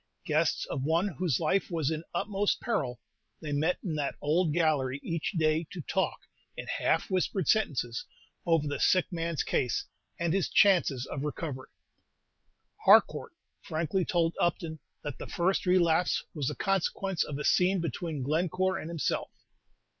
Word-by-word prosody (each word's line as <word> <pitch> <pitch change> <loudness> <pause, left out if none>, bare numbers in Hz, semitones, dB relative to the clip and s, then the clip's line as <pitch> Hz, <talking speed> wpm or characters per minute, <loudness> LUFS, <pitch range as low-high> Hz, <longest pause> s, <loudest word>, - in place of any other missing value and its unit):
Guests - - +1
of 130 - -4
one 165 +7 +1
whose 170 -5 -1
life 170 +5 +1
was 160 -4 0
in 160 0 -3
utmost 205 -1 0
peril, 135 - -2 0.4
they 155 -2 -6
met 155 +5 +1
in 175 - -2
that 145 -2 -2
old 160 +3 +2
gallery 145 -5 +1
each 165 +4 -2
day 160 -1 +1
to 175 - -6
talk, 190 +5 -1 0.4
in - - -5
half - - 0
whispered 185 -2 0
sentences, 125 - +1 0.4
over 165 -4 +2
the 145 - -3
sick 185 -1 +4
man's 170 -2 -1
case, 125 -3 0 0.3
and 170 -1 +1
his 195 -1 +1
chances 170 -10 +4
of 140 +1 -5
recovery. 145 -3 -4 1.1
Harcourt - - +5 0.3
frankly 165 +4 -1
told 170 -1 +1
Upton 165 -2 -1 0.2
that 145 -3 -5
the - - -6
first 185 +2 0
relapse 180 -1 +3
was 145 -5 -2
the - - -2
consequence 195 -1 0
of 140 - -5
a 150 - -4
scene 185 +1 +3
between 165 -2 -3
Glencore 185 +6 0
and 160 - -6
himself. 165 -4 -1
165 Hz, 155 wpm, -29 LUFS, 150-185 Hz, 1.1 s, Harcourt